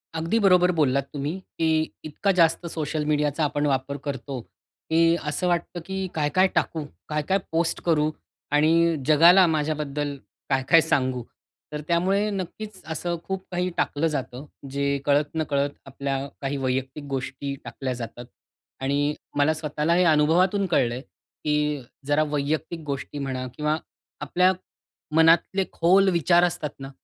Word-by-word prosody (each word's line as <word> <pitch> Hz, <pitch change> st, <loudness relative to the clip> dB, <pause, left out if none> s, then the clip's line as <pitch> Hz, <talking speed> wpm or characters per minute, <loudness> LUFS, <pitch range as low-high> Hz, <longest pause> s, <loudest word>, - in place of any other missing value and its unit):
अगदी 165 Hz, +8 st, 0 dB
बरोबर 180 Hz, -3 st, +5 dB
बोललात 140 Hz, -2 st, +2 dB
तुम्ही, 145 Hz, +2 st, -2 dB, 0.3 s
की 160 Hz, -1 st, +1 dB
इतका 155 Hz, +6 st, 0 dB
जास्त 165 Hz, +1 st, +3 dB
सोशल 155 Hz, -1 st, -2 dB
मीडियाचा 150 Hz, +1 st, +1 dB
आपण 145 Hz, 0 st, 0 dB
वापर 140 Hz, 0 st, -1 dB
करतो, 135 Hz, -1 st, -4 dB, 0.5 s
की 165 Hz, +1 st, +4 dB, 0.3 s
असं 180 Hz, +5 st, -1 dB
वाटतं, 175 Hz, 0 st, -1 dB
की 190 Hz, +1 st, -4 dB, 0.2 s
"काय-काय 155 Hz, +5 st, +3 dB
टाकू? 160 Hz, -2 st, 0 dB, 0.3 s
काय-काय 150 Hz, +6 st, +1 dB
पोस्ट 165 Hz, +1 st, 0 dB
करू? 155 Hz, -3 st, +3 dB, 0.5 s
आणि 155 Hz, +2 st, +4 dB, 0.4 s
जगाला 170 Hz, +5 st, +7 dB
माझ्याबद्दल 150 Hz, -2 st, -1 dB, 0.3 s
काय-काय 135 Hz, +4 st, +4 dB
सांगू?" 130 Hz, -2 st, +1 dB, 0.5 s
तर 150 Hz, 0 st, -4 dB
त्यामुळे 190 Hz, +5 st, +2 dB
नक्कीच 195 Hz, +1 st, -6 dB
असं 170 Hz, +2 st, -2 dB
खूप 190 Hz, 0 st, -4 dB
काही 180 Hz, 0 st, 0 dB
टाकलं 150 Hz, +3 st, +1 dB
जातं. 130 Hz, +1 st, -5 dB, 0.2 s
जे 140 Hz, 0 st, 0 dB
कळत-नकळत 145 Hz, -1 st, 0 dB
आपल्या 135 Hz, 0 st, -3 dB, 0.2 s
काही 140 Hz, 0 st, -2 dB
वैयक्तिक 130 Hz, +2 st, -2 dB
गोष्टी 135 Hz, +1 st, -4 dB
टाकल्या 125 Hz, +2 st, -4 dB
जातात. 120 Hz, +2 st, -7 dB, 0.6 s
आणि 145 Hz, +2 st, +1 dB, 0.2 s
मला 145 Hz, +2 st, +4 dB
स्वतःला 150 Hz, +1 st, -1 dB
हे 180 Hz, -, +4 dB
अनुभवातून 170 Hz, +6 st, +3 dB
कळलं 130 Hz, -9 st, +2 dB
आहे, 125 Hz, -, -5 dB
की 150 Hz, +2 st, -5 dB, 0.5 s
जरा 145 Hz, +1 st, +3 dB
वैयक्तिक 150 Hz, +4 st, -2 dB
गोष्टी 140 Hz, 0 st, -4 dB
म्हणा 130 Hz, -2 st, -3 dB
किंवा 150 Hz, +1 st, 0 dB, 0.4 s
आपल्या 180 Hz, +6 st, +3 dB, 0.6 s
मनातले 165 Hz, +4 st, +4 dB
खोल 190 Hz, +4 st, +4 dB
विचार 175 Hz, 0 st, +4 dB
असतात 170 Hz, -4 st, 0 dB
ना, 135 Hz, 0 st, -7 dB
150 Hz, 135 wpm, -25 LUFS, 140-170 Hz, 0.6 s, जगाला